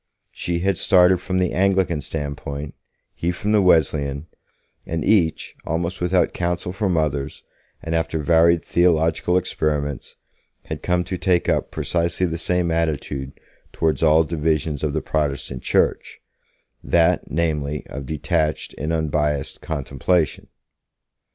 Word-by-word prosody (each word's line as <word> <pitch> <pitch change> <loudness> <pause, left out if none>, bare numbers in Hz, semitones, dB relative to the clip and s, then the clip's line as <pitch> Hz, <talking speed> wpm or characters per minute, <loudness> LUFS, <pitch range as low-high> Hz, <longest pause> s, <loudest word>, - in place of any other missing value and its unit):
She 85 -1 -3
had 95 -1 +1
started 90 -1 +5
from 95 0 -2
the 90 -1 +1
Anglican 95 -4 +2
standpoint, 70 0 -5 0.4
he 85 - -2
from 100 +4 -2
the 105 -1 +4
Wesleyan, 75 -5 +2 0.6
and 80 0 -3
each, 95 -7 +2
almost 85 +3 -3
without 90 0 +2
counsel 85 0 -2
from 95 -2 0
others, 75 -2 -2 0.4
and 80 - -3
after 80 0 0
varied 85 +2 +3
theological 85 0 +2
experiments, 75 -5 -2 0.5
had - - -6
come 90 0 +1
to 90 0 -5
take 90 -2 +1
up - - +1
precisely 85 +1 -1
the 85 -1 -3
same 90 0 0
attitude 75 -4 -2 0.3
towards 80 -4 0
all 80 0 +5
divisions 80 -2 -1
of 75 -2 0
the - - -1
Protestant 70 -4 -2
Church - - 0 0.6
that, 85 -1 +2
namely, 75 -3 -1
of 70 -1 -7
detached 80 +1 -1
and 75 +2 -2
unbiased 75 -3 -1
contemplation. 75 +2 -1
80 Hz, 130 wpm, -22 LUFS, 75-90 Hz, 0.6 s, started